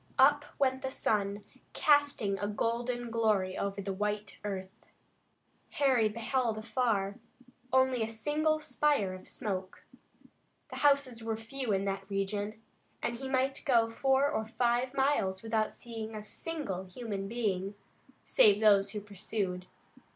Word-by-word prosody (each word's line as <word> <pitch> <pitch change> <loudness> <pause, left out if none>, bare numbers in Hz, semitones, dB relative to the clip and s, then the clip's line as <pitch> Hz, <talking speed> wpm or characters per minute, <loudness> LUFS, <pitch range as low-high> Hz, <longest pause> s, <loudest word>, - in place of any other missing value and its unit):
Up 290 +2 +5
went 260 -1 +1
the 265 - -2
sun, 205 -5 -1 0.3
casting 285 -10 +3
a 205 - -1
golden 235 +3 -2
glory 210 -5 +1
over 200 0 -3
the 195 0 -2
white 210 +1 -3
earth. 195 0 -6 0.8
Harry 255 -6 +3
beheld 230 +1 -1
afar 215 -3 0 0.5
only 260 -1 +3
a 220 - 0
single 300 +7 +1
spire 295 -9 +1
of 185 - -11
smoke. 190 -3 -4 0.8
The - - -7
houses 280 -5 +3
were 225 -1 -2
few 240 +2 -4
in 195 0 +1
that 195 0 -3
region, 205 +2 -2 0.4
and 235 - -1
he 265 +1 -5
might 265 +1 +1
go 235 -6 +3
four 270 +3 +3
or 220 -5 -2
five 240 +3 0
miles 245 -9 +1
without 220 -1 0
seeing 225 -2 -7
a 210 - -6
single 215 - -4
human 195 0 -5
being, 200 -4 -1 0.5
save 205 -1 +5
those 200 -2 +5
who 210 - -3
pursued. 195 -2 -3
220 Hz, 135 wpm, -31 LUFS, 200-260 Hz, 0.8 s, Up